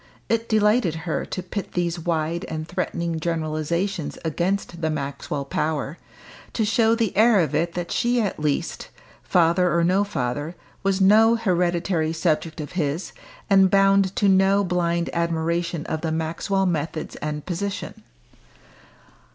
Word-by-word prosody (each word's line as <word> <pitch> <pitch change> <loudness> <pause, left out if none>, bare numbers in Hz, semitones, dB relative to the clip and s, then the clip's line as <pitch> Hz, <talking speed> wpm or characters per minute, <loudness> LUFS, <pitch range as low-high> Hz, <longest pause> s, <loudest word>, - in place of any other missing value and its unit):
It 230 0 0
delighted 210 -5 +3
her 165 - -2
to 185 - -4
pit 195 +2 -5
these 175 -1 -1
wide 165 0 -1
and 155 0 -5
threatening 170 -2 -2
generalisations 165 +2 -2
against 175 +2 -2
the 160 - 0
Maxwell 140 -1 -4
power 150 +2 -2 0.5
to 220 - 0
show 225 +1 +3
the 225 -4 -1
heir 220 0 +5
of 160 -6 0
it 170 +3 0
that 175 -1 -4
she 245 0 +1
at 205 -8 -1
least 150 -2 -2 0.3
father 175 +1 +3
or 170 - +3
no 185 +4 +3
father 145 -3 -3 0.3
was 195 -1 +1
no 220 +4 +6
hereditary 175 -5 0
subject 160 -1 -1
of 150 - -6
his, 160 -1 -2 0.3
and 195 -1 +5
bound 195 0 +3
to 205 - +2
no 195 +1 +4
blind 170 -2 0
admiration 170 -1 -1
of 155 - -3
the 160 - -2
Maxwell 165 +5 -1
methods 160 -2 -2
and 150 0 -4
position. 195 +3 -4
170 Hz, 145 wpm, -23 LUFS, 160-195 Hz, 0.5 s, no